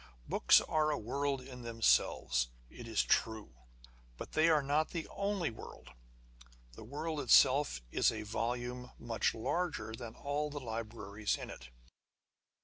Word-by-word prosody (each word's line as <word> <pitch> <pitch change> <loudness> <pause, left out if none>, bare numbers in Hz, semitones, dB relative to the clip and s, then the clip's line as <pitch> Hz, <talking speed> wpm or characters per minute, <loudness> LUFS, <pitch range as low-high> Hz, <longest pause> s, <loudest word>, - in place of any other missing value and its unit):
Books - - +6
are 155 -1 +1
a 150 - 0
world 140 +4 -2
in 125 -1 -10
themselves, 115 - +2 0.2
it 120 - -10
is 110 -2 +1
true; 110 - 0 0.6
but - - -8
they 160 +1 +4
are 155 -3 +4
not 150 +3 +1
the 165 -2 -4
only 200 - -1
world. 110 - -11 0.8
The - - -11
world 150 +6 -4
it 130 -4 -5
self 135 - +5
is - - +3
a 110 -1 -5
volume 120 +3 -3
larger 115 +4 -1
than 115 -1 -8
all 145 +1 -2
the 145 0 -5
libraries 110 -3 -3
in - - -7
it. 60 - -11
125 Hz, 140 wpm, -34 LUFS, 110-150 Hz, 0.8 s, Books